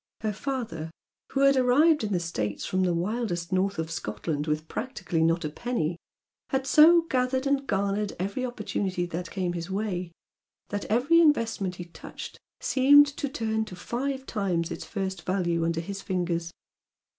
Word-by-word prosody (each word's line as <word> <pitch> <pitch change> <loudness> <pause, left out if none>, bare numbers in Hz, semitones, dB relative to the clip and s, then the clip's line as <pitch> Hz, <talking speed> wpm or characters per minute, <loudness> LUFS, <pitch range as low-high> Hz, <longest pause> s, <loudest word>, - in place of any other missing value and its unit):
Her 215 -1 -1
father, 230 - -4 0.4
who 270 - +1
had 275 0 +6
arrived 270 +4 +4
in 210 - -2
the 180 - +2
States 110 -12 -3
from 185 - 0
the 180 -2 +2
wildest 180 -1 -2
north 195 +2 +1
of 160 0 -3
Scotland 150 +3 -3
with 155 +1 -1
practically 195 -9 -3
not 165 0 +2
a - - -1
penny, 180 -3 -2 0.5
had 265 0 0
so 320 +5 +7
gathered 260 -3 0
and 275 0 +1
garnered 200 +1 0
every 200 +8 -2
opportunity 200 -6 -2
that 175 0 -5
came 185 -2 -2
in - - -5
his 170 0 -5
way 190 -3 -2 0.6
that 205 0 -3
every 260 +10 +4
investment 225 - +2
he 175 - -7
touched 170 - -9 0.2
seemed 285 +2 +6
to 285 - -2
turn 220 -5 -1
to 190 - -9
five 265 +8 -3
times 185 -7 -1
its - - -5
first 190 -4 -3
value 175 -2 0
under 165 0 0
his 195 +3 -6
fingers. 175 -3 -2
195 Hz, 170 wpm, -27 LUFS, 175-255 Hz, 0.6 s, so